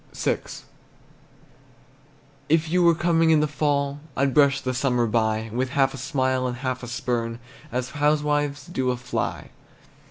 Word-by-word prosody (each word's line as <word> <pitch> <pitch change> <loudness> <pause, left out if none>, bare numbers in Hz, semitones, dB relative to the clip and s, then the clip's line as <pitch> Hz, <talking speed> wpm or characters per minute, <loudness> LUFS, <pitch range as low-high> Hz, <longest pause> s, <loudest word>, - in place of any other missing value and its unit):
VI. - - 0 2.1
If 160 0 +2
you 180 +1 +3
were 170 -1 +5
coming 165 -1 +2
in 160 -1 +5
the 150 - +2
fall, 145 -1 -1 0.2
I'd 135 0 +2
brush 140 -1 +4
the 130 -1 -3
summer 125 -2 +1
by 110 -1 0
With 130 +2 -1
half 135 -1 +2
a - - -7
smile 130 -1 0
and 125 -1 -4
half 130 -1 -3
a 120 - -7
spurn, 115 -1 -2 0.3
As 125 0 -3
housewives 145 -1 0
do 130 -7 -2
a 125 - 0
fly. 125 0 -4
135 Hz, 155 wpm, -24 LUFS, 125-150 Hz, 2.1 s, were